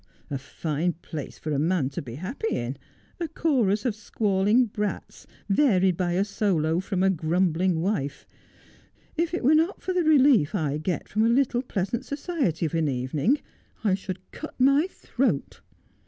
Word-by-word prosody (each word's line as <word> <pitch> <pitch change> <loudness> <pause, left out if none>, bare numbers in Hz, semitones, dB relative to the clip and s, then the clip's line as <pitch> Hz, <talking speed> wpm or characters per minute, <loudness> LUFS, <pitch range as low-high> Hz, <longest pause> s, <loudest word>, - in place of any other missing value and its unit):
'A 140 - -2
fine 160 +4 -2
place 160 -3 -8
for 155 - -5
a 140 - +1
man 160 -2 +1
to 135 - -5
be 120 -4 -8
happy 225 - -3
in - - -3 0.2
— - - -34
a 335 - -1
chorus 255 -10 +1
of 240 - +1
squalling 210 +2 +2
brats, 210 -2 -5 0.2
varied 195 - +3
by 175 0 0
a 190 +3 +2
solo 175 -6 +1
from 190 -1 -1
a 190 - +4
grumbling 175 +1 +1
wife. 155 -7 -2 0.9
If 335 0 0
it 350 - -2
were 280 +5 +5
not 325 +5 +2
for 370 - -1
the 360 -1 +2
relief 270 - +5
I 150 -5 -1
get 175 +3 -2
from 215 +2 +1
a 230 - +4
little 245 0 +2
pleasant 225 0 -2
society 280 - -1
of 155 - -3
an 165 -2 +1
evening 140 - 0 0.4
I 205 -4 +3
should 190 -1 -5
cut 310 - -9
my 275 +6 +4
throat.' 240 - -2
195 Hz, 170 wpm, -26 LUFS, 165-255 Hz, 0.9 s, were